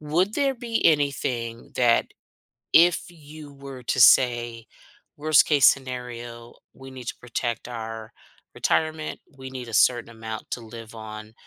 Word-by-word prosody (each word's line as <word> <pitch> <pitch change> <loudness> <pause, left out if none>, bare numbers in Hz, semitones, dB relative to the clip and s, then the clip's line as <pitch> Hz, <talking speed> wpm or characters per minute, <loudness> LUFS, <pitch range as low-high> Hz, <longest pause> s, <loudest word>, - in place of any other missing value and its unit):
would 170 +7 0
there 275 -2 +1
be 235 -2 -3
anything 130 -6 0
that 120 -2 +3 0.7
if 170 +1 +5
you 150 -3 -13
were 135 -2 -10
to 130 - -1
say, 120 -1 +4 0.5
"Worst-case 145 -1 +4
scenario, 120 -3 -3 0.2
we 135 0 -12
need 130 -2 -10
to - - -3
protect 120 -1 -4
our 115 -2 -7 0.4
retirement, 155 -1 -1 0.2
we 130 0 -8
need 130 -2 -7
a 115 - -9
certain 120 +2 +3
amount 110 -1 -8
to 120 - -3
live 115 0 -11
on 110 0 -9
125 Hz, 135 wpm, -24 LUFS, 115-150 Hz, 0.7 s, if